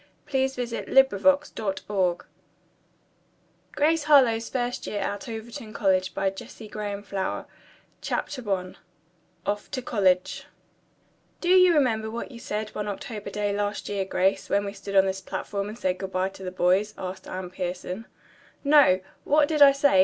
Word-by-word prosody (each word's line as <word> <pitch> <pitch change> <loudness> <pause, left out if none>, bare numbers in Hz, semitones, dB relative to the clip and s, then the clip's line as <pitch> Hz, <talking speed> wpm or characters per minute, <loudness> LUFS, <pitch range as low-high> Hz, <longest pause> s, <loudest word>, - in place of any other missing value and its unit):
Good 265 -2 +1
bye 250 - -1
to - - -2
their 235 - -4
Freshman - - -7
Year 270 - +10 0.4
239 190 -5 -1 1.6
Grace 315 +1 +2
Harlowe's 245 -6 +5
First 245 -1 -2
Year 205 - -2
at 200 +2 -3
Overton 225 -1 -7
College 185 -3 +1 1.9
CHAPTER 250 -8 -3
I 185 -1 -2 0.7
OFF 205 +1 -2
TO 255 - -3
COLLEGE 185 -6 +1 0.9
"Do 350 - -2
you 365 -2 +7
remember 225 -7 +2
what 230 +4 -5
you 235 - -10
said 215 -1 -3
one 210 0 -4
October 205 0 -5
day 205 0 -1
last 205 0 -2
year, 200 -1 -1
Grace, 190 0 0
when 200 0 +2
we 200 - -4
stood 200 0 -7
on 190 0 +6
this 190 0 -2
platform 200 +2 -4
and 215 - -8
said 185 -4 -1
good 190 0 -5
bye 185 +1 0
to 195 - -14
the 185 - -3
boys?" 185 +3 +1
asked 185 0 -6
Anne 185 -1 -5
Pierson. 180 +3 -5 0.6
"No, 280 -11 +6 0.2
what 295 0 +4
did 305 -1 -1
I 280 -1 +10
say?" 275 -7 +3
205 Hz, 155 wpm, -26 LUFS, 190-245 Hz, 1.9 s, Year